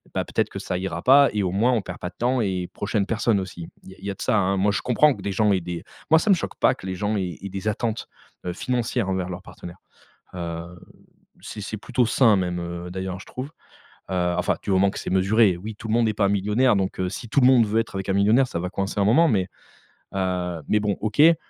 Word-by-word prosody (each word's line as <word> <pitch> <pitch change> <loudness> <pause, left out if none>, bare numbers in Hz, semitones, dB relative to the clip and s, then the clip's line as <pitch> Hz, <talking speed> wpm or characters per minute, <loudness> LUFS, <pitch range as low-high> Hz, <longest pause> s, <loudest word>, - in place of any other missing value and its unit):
bah, - - 0
peut - - -14
être - - -1
que - - -8
ça 90 - -3
ira 95 -2 -4
pas 140 +1 +7
et 105 -2 0
au 90 - -1
moins 110 +7 +2
on 115 - +1
perd 95 -1 -8
pas 90 - -4
de 90 - -22
temps 125 +1 +1
et 95 -4 -1
prochaines 105 0 -1
personnes 110 -2 +1
aussi. 90 -3 -7 0.2
Il - - -12
y - - -10
a - - -24
il 95 - -11
y 100 - -2
a 95 - -6
de - - -12
ça, 100 -5 +2
moi, 100 +2 +2
je 100 - -1
comprends 145 +4 +4
que - - -11
des 100 - -2
gens 105 +1 +3
aient 95 - +2
des 85 -1 -6 0.3
moi, 160 - +8
ça 210 - -1
me - - +7
choque 170 - -5
pas - - +4
que 95 - -10
les 95 - -3
gens 105 +3 -1
aient 90 -4 -3
aient 100 - -6
des 95 +2 -5
attentes, 110 +1 -2 0.4
heu, 90 - -1
financières 120 -1 -1
envers 95 -1 -1
leurs 90 +1 -7
partenaires. 90 -2 -11 0.6
Heu, 85 0 -6 0.6
c'est 105 - -8
c'est 105 - -5
plutôt 125 +3 0
sain 115 -2 +4
même, 90 -1 -1
heu, 85 +1 -6
d'ailleurs, 95 0 -4
je - - -12
trouve, 130 +2 -6 0.6
heu, 90 -1 0
enfin, 90 - +1
du - - -4
moment 95 +1 +4
que - - -7
c'est - - -5
mesuré. 95 +1 +3
Oui, 105 +5 -7
tout 110 - -8
le 110 - +1
monde 115 -1 +3
est 110 - -1
pas 100 -1 +2
millionnaire 105 +5 +2
donc, 95 -1 -2
heu, 90 - 0
si 115 +5 -7
tout 140 - +2
le 125 - +5
monde 125 -4 +5
veut 110 +2 +1
être 115 - -5
avec 95 0 -4
un 95 - +2
millionnaire, 105 +7 +4
ça 85 - -3
va 90 +1 -3
coincer 100 +1 -2
un - - +3
moment 125 +12 +5
mais, 95 -7 +1 0.7
heu, 90 -3 -2
mais, 105 - +3
bon. 105 -1 0
OK, 110 +2 -3
heu, 165 +2 +7
100 Hz, 275 wpm, -24 LUFS, 90-110 Hz, 0.7 s, moi